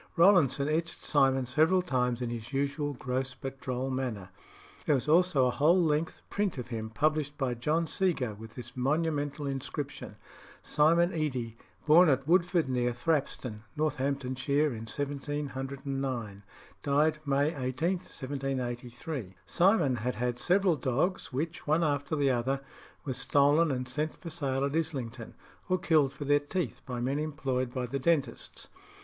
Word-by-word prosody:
Rowlandson 165 -6 +5
etched 165 +2 -2
Simon 135 -3 +3
several 160 +8 +3
times 125 -6 0
in 120 - -3
his 115 +1 -6
usual 140 +1 -1
gross 130 0 -3
but 135 0 -6
droll 130 +1 -2
manner. 115 -8 -3 0.6
There 150 - +4
was 135 +2 -1
also 160 -4 +4
a 125 - +2
whole 160 +8 +4
length 155 -1 0
print 205 -6 -1
of 125 -1 -6
him 110 -2 -4
published 150 +4 0
by 130 -3 0
John 150 +8 0
Seago, 160 - 0
with 110 +2 -11
this 125 +1 -8
monumental 145 +2 0
inscription 140 +1 -5 0.5
"Simon 170 +4 +3
Edy, 130 -8 -2 0.3
born 160 +3 +7
at 135 0 +1
Woodford, 175 -2 +3
near 125 -1 0
Thrapston, 125 -5 -1 0.2
Northamptonshire, 140 -1 0
in 115 0 -7
1709. 135 -5 -4 0.4
Died 150 +4 +2
May 145 +1 +2
18th, 160 +6 -2
1783." 130 - -4
Simon 170 - +3
had 125 +1 -2
had 120 +1 -2
several 180 +1 +3
dogs, 140 +9 -1
which, 155 +6 -4
one 155 +3 +3
after 145 0 0
the 140 -2 +2
other, 130 +3 0 0.4
were 135 - -2
stolen, 145 +5 +3
and 125 -2 -2
sent 155 +3 -2
for 170 - -8
sale 140 -4 -1
at 140 +2 -2
Islington, 125 -8 -3 0.3
or 185 - +3
killed 160 -7 +3
for 145 - -7
their 145 +1 +4
teeth 145 -1 -3
by 125 -2 -3
men 135 +4 -1
employed 135 -5 -2
by 125 -1 -2
the 135 +3 -3
dentists. 140 -4 -1
140 Hz, 150 wpm, -30 LUFS, 125-155 Hz, 0.6 s, born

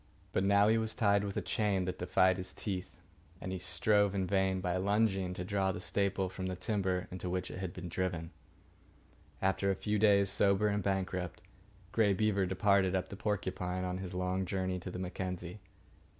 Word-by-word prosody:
But 95 - +2
now 100 +1 +5
he 110 +1 +4
was 110 0 +1
tied 100 -3 +3
with 100 -1 -4
a - - -1
chain 100 -4 0
that 90 0 -4
defied 95 +1 +3
his 95 -1 -7
teeth, 95 -3 -4 0.5
and 95 - -5
he 95 - -3
strove 100 +3 +2
in 95 -1 0
vain, 95 -1 +1
by 90 -1 -1
lunging, 95 -2 +1
to 90 - -4
draw 95 0 +1
the - - -5
staple 100 0 0
from 95 0 -5
the 95 - -3
timber 95 -1 -1
into 90 0 -5
which 90 0 -2
it - - -6
was 90 - -7
driven. 85 -1 -3 1.1
After 95 +1 +2
a 95 - +2
few 105 +2 -1
days, 100 -2 +4
sober 100 +1 +3
and 105 0 0
bankrupt, 95 -2 -2 0.5
Grey 105 -3 +3
Beaver 100 -1 +1
departed 95 0 +3
up 95 - -1
the - - -7
Porcupine 95 -3 -2
on 90 0 -2
his 90 -1 -6
long 90 +1 -1
journey 95 0 -1
to 90 - -7
the 90 - -6
Mackenzie. 90 0 -5
95 Hz, 190 wpm, -33 LUFS, 90-100 Hz, 1.1 s, now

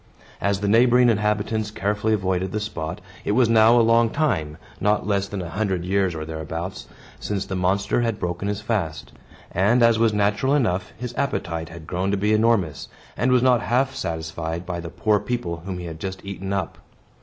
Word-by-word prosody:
As 100 -1 0
the 100 - 0
neighboring 120 +3 +5
inhabitants 105 0 0
carefully 105 +1 0
avoided 95 -1 -1
the 110 - -1
spot, 90 -3 -5 0.2
it 105 - 0
was 125 +1 +4
now 115 +1 +6
a 115 - +4
long 115 0 +4
time 100 - -1 0.2
(not 105 -1 +1
less 100 -1 0
than 100 -2 -4
a 85 - -6
hundred 95 -4 -1
years 95 -2 +1
or 80 0 -4
thereabouts) 80 +3 -5 0.3
since 100 -1 -3
the 95 - -4
monster 100 +5 +1
had 115 -3 0
broken 90 +2 -3
his 105 0 -2
fast; 105 -8 -3 0.4
and, 110 +7 +3
as 115 -1 +5
was 115 -1 +4
natural 105 +6 +1
enough, 95 -9 0
his 125 0 -5
appetite 85 - -2
had 85 -1 -10
grown 90 +4 -2
to 100 - +1
be 105 +2 +1
enormous, 110 -9 +1 0.3
and 125 - +1
was 125 -1 +4
not 125 -3 +4
half 125 +5 +1
satisfied 80 +1 -4
by 85 -1 -4
the 85 -1 -6
poor 105 +4 +1
people 95 -8 -3
whom 90 +2 -6
he 90 - -6
had 80 -2 -7
just 95 +2 -6
eaten 95 0 -5
up. 95 -4 -3
100 Hz, 195 wpm, -23 LUFS, 90-110 Hz, 0.4 s, now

